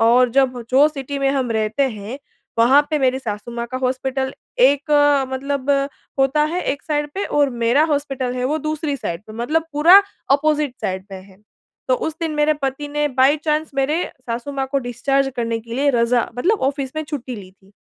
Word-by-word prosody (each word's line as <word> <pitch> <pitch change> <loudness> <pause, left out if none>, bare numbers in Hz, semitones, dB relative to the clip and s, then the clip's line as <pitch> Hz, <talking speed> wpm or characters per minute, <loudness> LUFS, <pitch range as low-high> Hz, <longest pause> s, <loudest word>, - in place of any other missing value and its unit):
और 240 +2 +5
जब 255 -1 +2
जो 270 +3 +6
सिटी 280 -2 -5
में 275 0 +1
हम 265 -3 -1
रहते 220 +4 0
हैं 215 +4 -7 0.4
वहाँ 250 +5 +6
पे 305 - +1
मेरी 260 -1 +2
सासू-माँ 235 0 -5
का - - -1
हॉस्पिटल 265 +1 -1 0.3
एक 280 +4 +3 0.4
मतलब 275 +1 -2 0.5
होता 270 +2 +3
है 360 - -1
एक 285 - -8
साइड 295 -1 -1
पे 400 - -2
और 290 -2 +2
मेरा 260 +7 +4
हॉस्पिटल 270 -3 -2
है 250 0 -2
वो 300 +4 0
दूसरी 305 -1 -2
साइड 170 -8 -5
पे। 215 - -10
मतलब 300 +8 0
पूरा 340 +7 +7 0.3
ऑपोज़िट 295 -1 +1
साइड 185 0 -2
में 190 - -8
है। 190 0 -18 0.5
तो - - +4
उस 315 - -3
दिन 330 -1 -1
मेरे 300 +1 +3
पति 270 +2 -2
ने 295 0 0
बाई 270 +2 +3
चांस 305 0 0
मेरे 285 +5 +1 0.2
सासू 235 +4 -4
माँ 270 -1 -2
को 280 - +3
डिस्चार्ज 270 +2 0
करने 230 -1 -1
के 230 +1 -8
लिए 280 +3 +2
रज़ा 240 -1 +2
मतलब 400 - +1
ऑफ़िस 275 -2 -4
में 310 - -1
छुट्टी 260 -4 -5
ली 190 -3 -11
थी। 195 0 -25
270 Hz, 195 wpm, -20 LUFS, 245-295 Hz, 0.5 s, पूरा